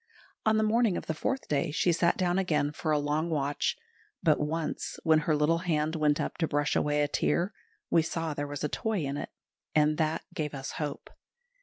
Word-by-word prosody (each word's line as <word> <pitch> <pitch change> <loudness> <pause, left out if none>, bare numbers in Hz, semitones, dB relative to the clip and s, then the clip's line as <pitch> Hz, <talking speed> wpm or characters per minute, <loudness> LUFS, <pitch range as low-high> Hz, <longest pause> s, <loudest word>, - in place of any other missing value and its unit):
On 220 0 +4
the 220 - +3
morning 220 -2 +3
of - - -5
the - - -1
fourth 265 - -2
day 150 +2 0
she 165 +4 +2
sat 170 +1 +2
down 180 0 +1
again 155 -6 +1
for 155 - -4
a 150 - +4
long 150 +3 0
watch; 145 -2 0 0.5
but - - +4
once 155 +1 -2
when 160 -2 +5
her 155 - +4
little 150 +3 +2
hand 160 -2 0
went 150 -1 +2
up 150 - -3
to 165 - +2
brush 145 0 0
away 150 0 +2
a - - +1
tear, 175 +6 0 0.4
we 165 - +5
saw 165 0 -2
there 145 0 -3
was 145 0 -5
a - - +2
toy 210 +3 -1
in 140 +1 -2
it, - - -4 0.5
and 150 0 +3
that 160 +1 0
gave 150 -2 -3
us 135 0 -5
hope. 150 -2 -5
155 Hz, 210 wpm, -29 LUFS, 150-170 Hz, 0.5 s, when